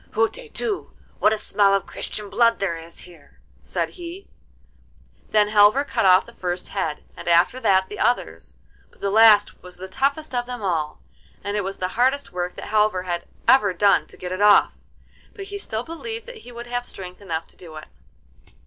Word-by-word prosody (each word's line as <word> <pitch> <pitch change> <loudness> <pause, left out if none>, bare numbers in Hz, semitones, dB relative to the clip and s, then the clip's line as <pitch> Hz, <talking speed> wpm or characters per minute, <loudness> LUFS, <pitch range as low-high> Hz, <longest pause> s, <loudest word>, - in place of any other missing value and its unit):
'Hutetu! 430 - -2 0.3
what 215 - +4
a 220 - +1
smell 200 -1 +2
of 195 - -1
Christian 210 -1 -5
blood 230 +2 +3
there 190 -4 -1
is 165 0 -11
here!' 165 -5 -15 0.2
said - - -2
he. 355 +2 -9 1.0
Then 210 -1 +3
Halvor 210 +6 +5
cut 195 - +1
off 185 0 +6
the 235 - -15
first 180 -4 -4
head, 160 -7 -3
and - - -10
after 175 +9 +3
that 190 -5 +3
the 210 - -9
others, 245 - -1 0.3
but - - -26
the 200 - -1
last 215 -1 +5
was 180 0 -12
the 190 +1 -8
toughest 280 +9 -1
of 245 0 -1
them 245 -3 -6
all, 160 -5 -2 0.4
and 205 +1 -3
it 205 - 0
was 195 +1 -5
the 185 - -2
hardest 260 +6 0
work 180 0 -4
that - - -8
Halvor 210 -3 +2
had 175 -2 -4 0.2
ever 210 -8 +5
done 200 +2 +3
to - - -15
get 180 0 -6
it 185 +2 -3
off, 205 0 +5 0.6
but 395 - -7
he 405 +1 -6
still 220 - -4
believed 445 - -7
that - - -10
he 245 - -13
would 240 0 -8
have 245 0 -3
strength 185 -5 -8
enough 165 -4 -4
to - - -17
do 165 -3 -12
it. 155 - -9
205 Hz, 195 wpm, -23 LUFS, 185-245 Hz, 1.0 s, off